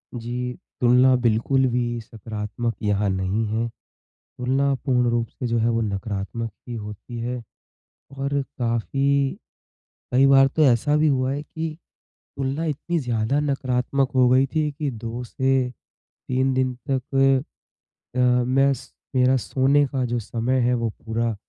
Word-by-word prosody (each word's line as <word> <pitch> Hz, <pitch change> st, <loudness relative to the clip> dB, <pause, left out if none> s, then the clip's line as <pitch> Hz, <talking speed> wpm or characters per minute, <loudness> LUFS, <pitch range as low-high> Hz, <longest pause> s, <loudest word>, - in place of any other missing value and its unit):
जी, 125 Hz, +1 st, -3 dB, 0.3 s
तुलना 125 Hz, +1 st, +5 dB
बिल्कुल 120 Hz, +4 st, +2 dB
भी 120 Hz, -1 st, -1 dB
सकारात्मक 110 Hz, +1 st, -5 dB
यहाँ 105 Hz, -1 st, +1 dB
नहीं 95 Hz, +4 st, 0 dB
है, 115 Hz, +2 st, -1 dB, 0.5 s
तुलना 135 Hz, +2 st, -1 dB
पूर्ण 125 Hz, -2 st, +1 dB
रूप 120 Hz, 0 st, 0 dB
से 125 Hz, -, -6 dB
जो 115 Hz, 0 st, +1 dB
है 115 Hz, +1 st, +2 dB
वो 115 Hz, 0 st, +1 dB
नकारात्मक 105 Hz, +2 st, -3 dB, 0.2 s
ही 120 Hz, -, -4 dB
होती 105 Hz, +2 st, -7 dB
है। 120 Hz, 0 st, -3 dB, 0.8 s
और 140 Hz, +1 st, 0 dB, 0.2 s
काफ़ी 135 Hz, +4 st, +1 dB, 0.8 s
कई 135 Hz, +2 st, +6 dB
बार 135 Hz, 0 st, +7 dB
तो 155 Hz, +3 st, +1 dB
ऐसा 140 Hz, +3 st, +3 dB
भी 155 Hz, 0 st, +3 dB
हुआ 130 Hz, -2 st, +1 dB
है 145 Hz, +1 st, -2 dB
कि 160 Hz, 0 st, -5 dB, 0.6 s
तुलना 135 Hz, +4 st, -1 dB
इतनी 160 Hz, +3 st, -1 dB
ज़्यादा 120 Hz, +1 st, 0 dB
नकारात्मक 135 Hz, -1 st, 0 dB
हो 125 Hz, -1 st, +5 dB
गई 130 Hz, +2 st, +5 dB
थी 150 Hz, -1 st, +1 dB
कि 145 Hz, 0 st, -3 dB
2 115 Hz, +2 st, -5 dB
से, 130 Hz, 0 st, +1 dB, 0.6 s
3 130 Hz, +1 st, +1 dB
दिन 130 Hz, -1 st, +1 dB, 0.2 s
तक 130 Hz, 0 st, -2 dB, 1.0 s
अ, -, -, 0 dB
मैं 125 Hz, +2 st, +3 dB
स 135 Hz, +1 st, -11 dB, 0.2 s
मेरा 130 Hz, +1 st, +4 dB
सोने 140 Hz, +4 st, +2 dB
का 130 Hz, -1 st, -2 dB
जो 120 Hz, 0 st, -1 dB
समय 120 Hz, +4 st, -1 dB
है 125 Hz, +1 st, +2 dB
वो 115 Hz, -1 st, -1 dB
पूरा 115 Hz, +1 st, -2 dB
125 Hz, 150 wpm, -23 LUFS, 115-135 Hz, 1.0 s, बार